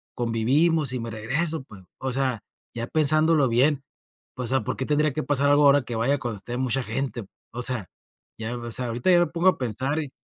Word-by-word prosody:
convivimos 130 +6 +1
y 125 - -2
me 115 0 -5
regreso, 140 +9 -1
pues. 105 -6 -15
O 130 0 -4
sea, 130 -3 -1 0.3
ya 115 0 -2
pensándolo 155 -1 +3
bien, 135 +4 +3 0.5
o 125 -2 -3
sea, 130 +1 +1
¿por - - -4
qué 130 - -2
tendría 150 +1 +1
que 155 - -3
pasar 145 0 +1
algo 145 +1 +4
ahora 140 -1 +5
que 120 - -5
vaya 130 +5 +1
cuando 120 -4 -4
esté 120 +5 -5
mucha 130 0 -1
gente? 120 -1 -2 0.3
O 120 - -6
sea, 120 -8 +1 0.5
ya 115 +2 -4
o 120 -1 -7
sea, 125 +2 -1
ahorita 120 +9 0
ya 175 - +5
me 175 - +2
pongo 170 +4 +2
a - - -1
pensar 130 +5 -2
y 145 -4 -5
130 Hz, 215 wpm, -24 LUFS, 120-150 Hz, 0.5 s, ahora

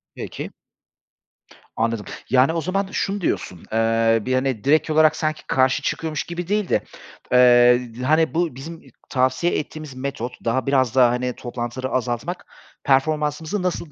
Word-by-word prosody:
Peki. - - -6 1.2
Anladım. 115 -2 -1 0.2
Yani, 130 +5 +4
o 165 - -1
zaman 190 +4 -1
şunu 200 0 -2
diyorsun, 90 - -2
eee, 115 0 +2
bir, 130 - 0
hani, 130 -4 0
direkt 155 +3 +3
olarak 155 0 +4
sanki 155 0 -3
karşı 130 0 +2
çıkıyormuş 155 -2 -2
gibi 170 0 -6
değil 205 -1 0
de, - - +2 0.5
eee, 125 -1 +6 0.2
d - - -4
hani, 155 +4 +2
bu 165 -4 0
bizim 160 +5 -9 0.3
tavsiye 130 +5 +1
ettiğimiz 155 -2 -8
metot 130 -2 -5
daha, 120 +2 0
biraz 130 -3 +2
daha, 125 -2 +6
hani, 125 0 -2
toplantıları 120 +1 -5
azaltmak, 130 +7 -3 0.4
performansımızı 150 +6 0
nasıl 175 -3 -3
135 Hz, 145 wpm, -22 LUFS, 125-160 Hz, 1.2 s, eee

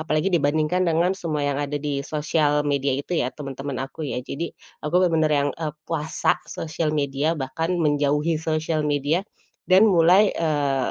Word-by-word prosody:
apalagi 155 +3 0
dibandingkan 155 +2 +2
dengan 170 +3 +2
semua 155 -4 -2
yang 145 0 0
ada 145 0 -2
di 145 -1 -2
sosial 150 0 0
media 140 -1 0
itu 170 +4 -2
ya, 125 - 0
teman-teman 135 -1 -5
aku 135 - -12
ya, - - -3
jadi, 155 +4 -4 0.4
aku 150 +3 -4
benar-benar 160 -3 +2
yang, 145 - 0
eee, 155 -2 -2
puasa 160 0 -1
sosial 160 0 -3
media, 145 +3 0
bahkan 160 +6 -2
menjauhi 150 +2 +1
sosial 155 0 -1
media, 145 +4 +1 0.4
dan 190 +4 +6
mulai, 185 +3 +5
eee, 145 -5 0
150 Hz, 160 wpm, -23 LUFS, 145-165 Hz, 0.4 s, dan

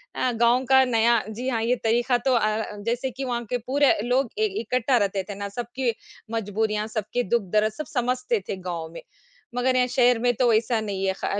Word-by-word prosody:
अ, 255 - 0
गाँव 235 +2 +3
का 265 0 +7
नया 235 -1 +3
जी 240 +4 -5
हाँ, 230 -3 -1
ये 240 +2 +2
तरीका 240 +2 +2
तो 260 +2 0
अ, 215 -1 +1 0.2
जैसे 245 +3 -1
कि 265 +4 -6
वहाँ 240 -1 -2
के 250 - 0
पूरे 280 +1 +4
लोग 250 0 +1
इ 435 - +3 0.2
इकट्ठा 250 +2 +1
रहते 195 -2 0
थे 205 - -5
ना, 200 0 -5
सबकी 240 +3 -2 0.4
मजबूरियाँ, 215 0 -1
सबके 220 +2 -2
दुःख 235 +3 +1
दर्द 215 +1 +3
सब 305 - -6
समझते 250 -2 0
थे - - -1
गाँव 165 -2 -4
में। - - -8 0.5
मगर 255 +1 +1
यहाँ 250 0 +3
शहर 245 -1 +3
में 245 +1 +2
तो 250 +2 +2
वैसा 225 +1 +2
नहीं 195 -2 -3
है, 190 - +1
ख 195 - -6
235 Hz, 210 wpm, -24 LUFS, 215-250 Hz, 0.5 s, का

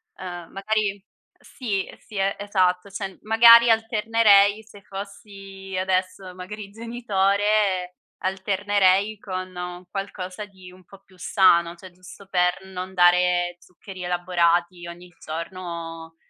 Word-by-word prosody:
uhm, 175 -2 -8
magari 200 0 -2 0.4
sì, 210 -7 -4
sì 215 - -15
e 195 0 0
esatto, 185 -2 0
cioè 195 0 -5
m - - -20
magari 230 +2 +7
alternerei 220 -2 +3
se 205 -2 -16
fossi 195 -1 -9
adesso, 185 0 -2
magari, 200 +3 -8
genitore 205 -4 0 0.3
alternerei 195 +1 +1
con 185 -2 -6
un 180 0 -7
qualcosa 195 0 -6
di 190 -3 -15
un 185 0 -18
po' 195 +2 -17
più 185 - -22
sano, 170 -2 +3
cioè 185 +2 -13
giusto 185 +2 -15
per 180 0 0
non 190 0 -7
dare 175 0 +3
zuccheri 185 +1 -12
elaborati 175 0 0
ogni 175 +1 -11
giorno 165 0 -7
190 Hz, 120 wpm, -23 LUFS, 180-205 Hz, 0.4 s, magari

